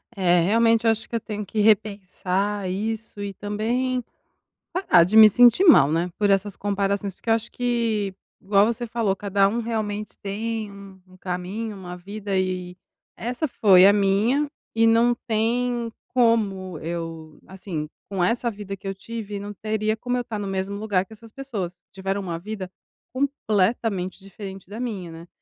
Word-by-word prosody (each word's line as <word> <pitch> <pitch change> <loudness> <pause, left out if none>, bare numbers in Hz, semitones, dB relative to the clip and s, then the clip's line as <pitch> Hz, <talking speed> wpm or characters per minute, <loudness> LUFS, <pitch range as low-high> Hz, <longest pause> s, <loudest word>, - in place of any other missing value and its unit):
É, 180 -2 +3
realmente 230 +5 +3
eu - - +6
acho 225 +1 -2
que - - -5
eu - - +1
tenho 210 -1 -5
que 215 - -4
repensar 200 -2 +1
isso 215 +2 -4
e 200 -1 -4
também 235 +6 -1 0.7
parar 345 - +4
de 195 +6 0
me 220 -1 +11
sentir 245 - +6
mal, 215 - +7
né, 170 +2 0
por 205 -1 +2
essas 195 0 +1
comparações, 200 -1 -1
porque 225 - -5
eu - - +6
acho 225 +1 -3
que, 230 -5 0 0.3
igual 200 +1 +4
você 235 +1 -2
falou 225 -4 0
cada 200 0 +2
um 230 +4 -1
realmente 215 -2 -3
tem 215 +2 -4
um 200 -1 -13
um 185 0 -18
caminho, 190 +4 -4
uma 180 -2 -8
vida 200 +2 -5
e 180 -1 -2 0.4
essa 245 +7 -2
foi 195 -8 +6
a 200 - +7
minha 210 +9 +2 0.3
e 225 0 +3
não 230 +2 +4
tem 235 +1 0 0.2
como 210 -7 +1
eu, 165 -2 -6
assim, 180 -5 -6 0.2
com 195 -3 -1
essa 235 +5 +1
vida 200 -2 -7
que 195 +1 -8
eu 195 - -3
tive 210 +1 -6
não 205 +1 -7
teria 215 +1 -1
como 245 +2 -2
eu 245 - 0
estar 225 -3 -5
no 205 - -4
mesmo 195 +1 -2
lugar 200 -3 0
que - - -18
essas 225 +1 -13
pessoas, 205 -9 -6
que - - -75
tiveram 195 +1 -3
uma 170 -4 -4
vida 195 +1 -6 0.5
completamente 215 -7 0
diferente 195 -1 -9
da 215 +4 -7
minha, 200 -9 -4
né, 165 +1 -11
205 Hz, 175 wpm, -24 LUFS, 190-225 Hz, 0.7 s, me